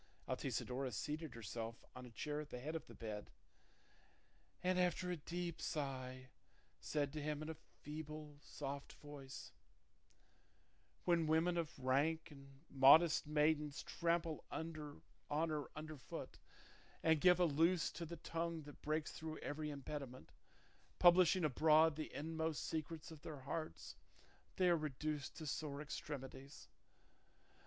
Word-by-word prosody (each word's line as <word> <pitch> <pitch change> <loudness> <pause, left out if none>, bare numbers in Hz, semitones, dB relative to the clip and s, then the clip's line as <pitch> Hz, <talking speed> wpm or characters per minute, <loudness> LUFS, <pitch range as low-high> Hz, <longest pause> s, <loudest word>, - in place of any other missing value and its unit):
Altisidora 130 +1 -1
seated 150 +6 -3
herself 115 +1 -5
on 125 0 -7
a - - -10
chair 150 +6 -3
at 150 - -9
the 125 - -5
head 155 +6 -4
of 160 - -4
the - - -11
bed, 105 -2 -5 1.3
and, 185 0 +3
after 180 0 +2
a - - 0
deep 170 +2 -4
sigh, 130 -4 -3 0.5
said 145 -2 -1
to 155 - -3
him 150 0 -2
in 155 - -5
a 160 - -11 0.2
feeble, 150 -1 -6
soft 140 -1 -5
voice, 140 -2 -9 1.5
"When 170 -3 +4
women 165 +3 +3
of 165 -2 -2
rank 145 +5 +1
and 140 -1 -14
modest 145 +4 +7
maidens 150 -1 +2
trample 170 -2 0
honour 155 -3 -5 0.3
under 155 0 -2
foot, 130 - -7 0.6
and 160 -2 +4
give 180 -1 +7
a 180 - +6
loose 165 +3 +3
to 170 - -5
the 170 +1 -5
tongue 165 0 -2
that 145 0 -12
breaks 155 +1 0
through 155 -1 -5
every 150 +1 -3
impediment, 140 -2 -6 0.7
publishing 180 0 +7
abroad 155 +2 +5
the 155 0 -4
inmost 160 0 -2
secrets 160 0 -3
of 155 -2 -10
their 150 -3 -7
hearts, 140 - -4 0.6
they 185 - +4
are 175 -1 +5
reduced 150 -1 -3
to 160 - -6
sore 145 -1 -2
extremities. 140 -2 -6
150 Hz, 135 wpm, -40 LUFS, 140-160 Hz, 1.5 s, modest